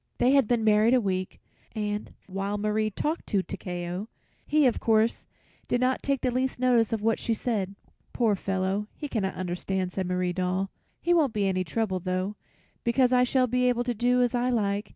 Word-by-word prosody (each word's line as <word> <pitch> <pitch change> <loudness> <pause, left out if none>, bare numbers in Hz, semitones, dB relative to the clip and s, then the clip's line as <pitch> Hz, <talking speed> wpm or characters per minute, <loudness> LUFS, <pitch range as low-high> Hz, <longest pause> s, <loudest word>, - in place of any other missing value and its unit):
They 250 - +3
had 275 -5 +4
been 235 -1 +1
married 215 +3 +5
a - - +5
week, 185 -4 -2 0.4
and, 210 -1 -3
while 195 +2 -3
Marie 215 +1 0
talked 305 - -3
to 195 -2 +1
Takeo, 180 +4 -5 0.4
he, 300 -1 +4
of 245 - +2
course, 225 0 +2 0.4
did 245 - +1
not 255 +1 +1
take 275 -2 0
the 255 - +1
least 255 +1 -1
notice 245 -3 +3
of 220 -2 -2
what 225 0 +2
she 230 - 0
said. 205 -4 -2 0.4
"Poor 225 -4 +2
fellow, 195 +2 -1
he 295 - -5
cannot 200 -8 -2
understand," 185 +1 -2
said 190 -2 -2
Marie 180 0 0
Doll. 185 +1 -1 0.3
"He 350 - +2
won't 300 -9 +3
be 205 -2 0
any 185 -1 +1
trouble, 190 +2 -1
though, 185 +3 -2 0.5
because 250 +1 +3
I 250 0 +5
shall 255 +1 +3
be 250 +1 +2
able 240 -1 +1
to 245 0 -1
do 245 +2 +2
as 245 - 0
I 245 +1 +1
like. 205 -3 0
215 Hz, 195 wpm, -27 LUFS, 190-245 Hz, 0.5 s, married